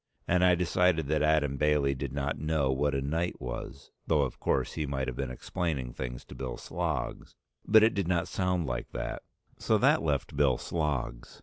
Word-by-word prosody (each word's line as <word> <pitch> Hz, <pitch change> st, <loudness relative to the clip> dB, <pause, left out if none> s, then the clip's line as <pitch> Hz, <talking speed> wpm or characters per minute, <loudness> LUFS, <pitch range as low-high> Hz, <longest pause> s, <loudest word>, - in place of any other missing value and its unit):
And 90 Hz, +1 st, +3 dB
I 90 Hz, -1 st, +6 dB
decided 90 Hz, -2 st, +2 dB
that 75 Hz, -1 st, +2 dB
Adam 75 Hz, -3 st, +2 dB
Bailey 75 Hz, -2 st, +2 dB
did 70 Hz, 0 st, -4 dB
not 70 Hz, 0 st, -2 dB
know 75 Hz, -2 st, +1 dB
what 70 Hz, +2 st, +1 dB
a 70 Hz, -, -1 dB
knight 80 Hz, +5 st, -1 dB
was, 65 Hz, +3 st, -7 dB, 0.2 s
though 75 Hz, -3 st, +3 dB
of 65 Hz, -, -4 dB
course -, -, 0 dB
he 75 Hz, -, -2 dB
might 65 Hz, -1 st, -2 dB
have 65 Hz, -, -3 dB
been 70 Hz, 0 st, -3 dB
explaining 65 Hz, -1 st, -3 dB
things 60 Hz, -1 st, -6 dB
to -, -, -11 dB
Bill 65 Hz, -2 st, -5 dB
Sloggs, -, -, -3 dB, 0.3 s
but 110 Hz, 0 st, +7 dB
it 110 Hz, -, +4 dB
did 100 Hz, -4 st, -1 dB
not 85 Hz, -2 st, +1 dB
sound 90 Hz, -3 st, 0 dB
like 65 Hz, -1 st, -3 dB
that; -, -, -4 dB, 0.4 s
so -, -, +2 dB
that -, -, +4 dB
left -, -, -1 dB
Bill 70 Hz, -3 st, +3 dB
Sloggs. 70 Hz, -7 st, -3 dB
75 Hz, 195 wpm, -29 LUFS, 65-85 Hz, 0.4 s, but